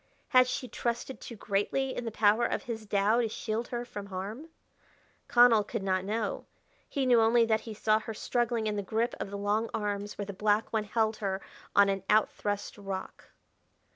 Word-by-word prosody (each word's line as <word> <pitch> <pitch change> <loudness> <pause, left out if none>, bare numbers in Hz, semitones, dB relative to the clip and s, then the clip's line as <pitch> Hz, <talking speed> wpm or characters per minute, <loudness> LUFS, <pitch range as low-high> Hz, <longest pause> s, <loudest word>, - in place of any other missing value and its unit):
Had 255 -1 +6
she 255 0 -3
trusted 240 +2 -3
too 235 - -8
greatly 215 +6 -1
in 245 - -4
the 225 - -3
power 215 +2 +3
of - - 0
his 220 -2 -6
Tao 205 +4 +3
to 230 - 0
shield 220 +2 -3
her 240 0 -4
from 205 -4 -7
harm? 200 - -6 0.8
Connell 240 -3 +6
could 210 0 -4
not 185 -1 +1
know. 215 +2 -2 0.4
He 275 -2 -1
knew 245 -2 +5
only 230 +1 +5
that 220 -1 +1
he 215 - -6
saw 215 +1 +2
her 220 0 -6
struggling 240 -1 0
in 210 -1 -1
the - - 0
grip 225 +5 -1
of - - -4
the 200 - -5
long 210 +3 0
arms 205 -1 -3
where 205 - -3
the 200 - -6
black 210 +3 +1
one 215 -1 +1
held 220 0 0
her 195 -2 -2 0.4
on 200 0 +7
an 195 -1 0
outthrust 205 -1 0
rock. 195 -1 -6
215 Hz, 195 wpm, -30 LUFS, 205-235 Hz, 0.8 s, on